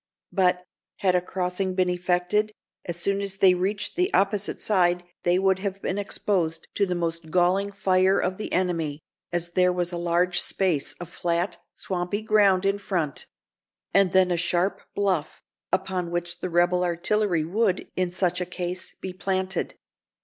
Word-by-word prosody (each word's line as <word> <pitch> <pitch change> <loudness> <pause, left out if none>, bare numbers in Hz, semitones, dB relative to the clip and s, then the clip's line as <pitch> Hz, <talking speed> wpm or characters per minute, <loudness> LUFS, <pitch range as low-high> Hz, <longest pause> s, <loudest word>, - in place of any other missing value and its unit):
But, 180 -2 +2 0.4
had 185 -2 +3
a 180 - +3
crossing 185 +1 -2
been 185 -1 +2
effected, 180 +4 0 0.3
as 175 -1 -4
soon 200 +3 0
as 195 -1 -2
they 190 -2 +6
reached 195 +3 -1
the 360 +3 +1
opposite 200 +1 +1
side 180 -3 +2 0.2
they 175 +1 +2
would 190 0 +2
have 195 0 -3
been 195 0 -2
exposed 175 -5 -1
to 200 - +1
the 180 - -1
most 165 -1 -3
galling 185 +3 +2
fire 190 -1 +3
of 185 +1 -1
the - - -4
enemy, 165 -5 0 0.3
as 175 0 -1
there 180 +1 +3
was 175 0 -1
a 175 - -3
large 175 +1 +2
space 180 -7 0
of 175 - -9
flat, 175 +2 -1
swampy 185 +3 -3
ground 200 -3 +4
in 200 +1 +1
front; 170 -8 -2 0.7
and 195 -2 +4
then 185 -1 +4
a 175 - +1
sharp 175 +3 0
bluff, 185 -7 -1 0.3
upon 185 -1 -1
which 175 0 -2
the 185 - -3
rebel 175 +1 +3
artillery 175 0 +1
would, 190 +3 0
in 185 -1 0
such 180 0 0
a - - -1
case, 180 0 -5
be 185 - -5
planted. 190 -1 -2
180 Hz, 165 wpm, -25 LUFS, 175-195 Hz, 0.7 s, they